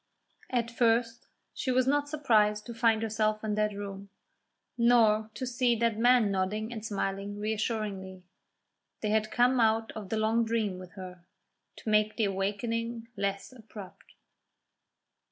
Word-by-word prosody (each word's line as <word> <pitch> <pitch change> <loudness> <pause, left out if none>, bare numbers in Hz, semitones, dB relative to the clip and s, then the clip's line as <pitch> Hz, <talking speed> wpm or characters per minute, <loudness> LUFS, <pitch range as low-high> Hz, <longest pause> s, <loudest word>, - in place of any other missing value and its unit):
At 235 -2 -1
first 230 0 +1 0.3
she 265 - -4
was 255 0 +3
not 290 +2 +1
surprised 215 -8 +2
to 235 - -7
find 225 -1 +2
herself 215 -1 0
in 215 -1 -1
that 210 -1 0
room, 200 -1 -7 0.7
nor 225 -3 +4
to 260 - -4
see 245 -1 +1
that 230 -1 0
man 240 -3 +4
nodding 210 +4 -2
and 220 -3 -7
smiling 200 -1 -3
reassuringly; 210 -3 -3 0.8
they 210 - -1
had 215 0 +1
come 250 +2 +3
out 225 0 +2
of 210 -4 -8
the 220 - -1
long 220 +2 +2
dream 220 -5 -1
with 185 -1 -11
her, 185 -3 -10 0.5
to - - -6
make 215 0 +3
the 225 - +2
awakening 225 +4 -2
less 200 +3 -3
abrupt. 215 -5 -13
220 Hz, 145 wpm, -29 LUFS, 205-235 Hz, 0.8 s, nor